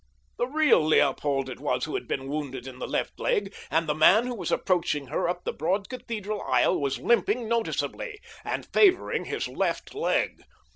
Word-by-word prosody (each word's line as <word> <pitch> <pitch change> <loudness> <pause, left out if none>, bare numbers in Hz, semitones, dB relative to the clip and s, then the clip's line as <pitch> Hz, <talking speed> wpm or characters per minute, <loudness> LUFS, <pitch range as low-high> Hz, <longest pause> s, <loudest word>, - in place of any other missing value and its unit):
The 245 - +1
real 300 - +4
Leopold 140 -2 +2
it 130 - -7
was - - -1
who - - -6
had - - -3
been 135 0 -3
wounded 135 -3 -4
in 130 -1 -9
the - - -4
left - - -2
leg, 475 -4 0 0.2
and 165 0 +1
the 150 - +2
man 185 +9 +5
who 250 - -3
was 185 -8 -4
approaching 160 -7 0
her 155 - 0
up 175 0 -3
the - - -3
broad 195 +5 -1
cathedral 215 -5 -4
aisle 185 - +2
was 140 -1 0
limping 230 +1 +1
noticeably—and 235 - -3
favoring 380 -3 +3
his - - -3
left - - -2
leg. 435 +4 0
180 Hz, 180 wpm, -27 LUFS, 145-235 Hz, 0.2 s, man